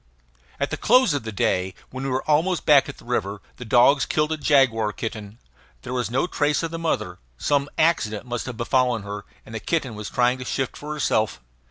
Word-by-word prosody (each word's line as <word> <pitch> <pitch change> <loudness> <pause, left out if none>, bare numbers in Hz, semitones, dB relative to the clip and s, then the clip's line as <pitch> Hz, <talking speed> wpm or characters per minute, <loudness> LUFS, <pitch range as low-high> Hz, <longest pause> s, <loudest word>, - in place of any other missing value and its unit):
At - - -1
the - - -2
close 250 - +4
of 145 - -1
the 110 - -4
day, 95 -1 0 0.2
when 130 +1 -6
we 135 - -2
were 130 0 -1
almost 160 +4 +2
back 145 -2 +5
at 145 - -8
the - - -16
river, 105 -4 -2 0.2
the 125 - -8
dogs 125 +5 +4
killed 150 0 0
a 160 - -1
jaguar 130 -7 +3
kitten. 110 -1 -6 0.5
There 125 - -5
was 125 -4 -1
no 125 +7 +1
trace 150 -3 0
of 165 - -3
the 165 - -4
mother. 110 - -2 0.2
Some 140 - 0
accident 125 -10 +1
must 120 0 -4
have 120 -3 -6
befallen 120 -1 +1
her, 100 0 -6 0.2
and 110 - -12
the 110 - -3
kitten 140 -2 -2
was 105 -1 -6
trying 125 +1 +1
to - - -5
shift 135 0 -2
for 150 +1 -7
herself. 110 - 0
125 Hz, 215 wpm, -23 LUFS, 110-145 Hz, 0.5 s, back